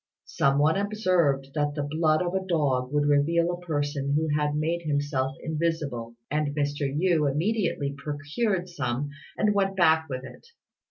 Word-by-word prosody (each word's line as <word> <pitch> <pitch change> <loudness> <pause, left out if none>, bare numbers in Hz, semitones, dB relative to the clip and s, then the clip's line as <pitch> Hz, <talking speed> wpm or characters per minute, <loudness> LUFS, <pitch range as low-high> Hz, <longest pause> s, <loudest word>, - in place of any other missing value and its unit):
Some 140 0 +1
one 155 +4 +3
observed 185 -10 +1
that 145 -1 0
the 145 - -1
blood 155 +2 +1
of 175 0 -2
a 190 0 0
dog 140 -8 0
would 145 0 +2
reveal 165 +4 +3
a 175 0 -6
person 145 -4 -1
who 160 +1 +1
had 150 0 0
made 165 +3 0
himself 145 -3 -1
invisible, 150 -8 -2 0.2
and 150 -1 0
Mr. 145 -1 -1
Yü 155 -1 +2
immediately 165 -3 0
procured 155 +7 -2
some 145 -4 -3 0.3
and 210 -1 +2
went 195 -1 +1
back 160 -3 +4
with 130 -1 -4
it. 130 - -12
150 Hz, 160 wpm, -26 LUFS, 145-170 Hz, 0.3 s, back